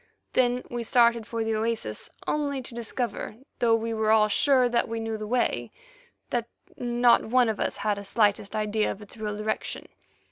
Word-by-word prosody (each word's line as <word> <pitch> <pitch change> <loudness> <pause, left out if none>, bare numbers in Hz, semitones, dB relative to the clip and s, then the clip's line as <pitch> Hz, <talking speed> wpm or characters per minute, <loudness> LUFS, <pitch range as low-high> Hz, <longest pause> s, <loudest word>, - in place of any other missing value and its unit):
Then 250 0 +2
we 240 0 -4
started 235 -1 +3
for 230 -1 -2
the 225 0 -1
oasis, 220 - -2 0.2
only 285 -2 0
to 240 - -8
discover, 235 -1 -3 0.2
though 230 -1 +4
we 225 0 -2
were 220 -1 0
all 215 -1 +5
sure 260 +3 +4
that 240 -1 +1
we 230 0 -3
knew 225 0 -3
the 215 -1 -5
way, 245 +2 0 0.6
that 240 -1 -1 0.3
not 240 0 +3
one 245 +1 +3
of 220 - -2
us - - -1
had 210 -1 -1
a - - -7
slightest 205 0 +1
idea 215 0 0
of 210 - -8
its 205 - -11
real 210 -1 -3
direction. 215 +1 -3
225 Hz, 185 wpm, -27 LUFS, 215-240 Hz, 0.6 s, all